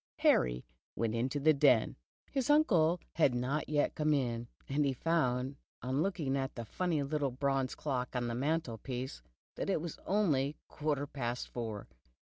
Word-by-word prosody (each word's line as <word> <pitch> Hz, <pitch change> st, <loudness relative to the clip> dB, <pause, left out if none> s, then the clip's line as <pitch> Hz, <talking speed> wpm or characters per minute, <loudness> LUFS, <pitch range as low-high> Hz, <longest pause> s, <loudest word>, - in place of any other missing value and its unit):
Ham* 60 Hz, 0 st, +3 dB, 0.3 s
went 115 Hz, +3 st, 0 dB
to 145 Hz, -, -1 dB
the 155 Hz, +2 st, +5 dB
den. 135 Hz, -6 st, +4 dB, 0.4 s
His 270 Hz, -2 st, -1 dB
uncle 180 Hz, -, +4 dB
had 140 Hz, -6 st, +3 dB
not 130 Hz, +5 st, -1 dB
yet 150 Hz, -1 st, +2 dB
come 150 Hz, -1 st, +2 dB
in, 120 Hz, -3 st, -1 dB, 0.2 s
and 145 Hz, +2 st, +1 dB
he 140 Hz, -2 st, +1 dB
found, 135 Hz, -3 st, 0 dB, 0.3 s
on 130 Hz, +4 st, 0 dB
looking 160 Hz, -8 st, 0 dB
at 135 Hz, -1 st, -2 dB
the 115 Hz, -, -5 dB
funny 165 Hz, -, 0 dB
little 145 Hz, 0 st, 0 dB
bronze 135 Hz, 0 st, 0 dB
clock 130 Hz, -4 st, -3 dB
on 125 Hz, -1 st, 0 dB
the 120 Hz, -, -2 dB
mantelpiece, 130 Hz, -2 st, -2 dB, 0.4 s
that -, -, -2 dB
it 190 Hz, -, +2 dB
was 165 Hz, 0 st, -6 dB
only 155 Hz, -8 st, +2 dB
quarter 145 Hz, -2 st, -1 dB
past 125 Hz, -4 st, -4 dB
four. 110 Hz, -4 st, -5 dB
140 Hz, 160 wpm, -33 LUFS, 125-155 Hz, 0.4 s, the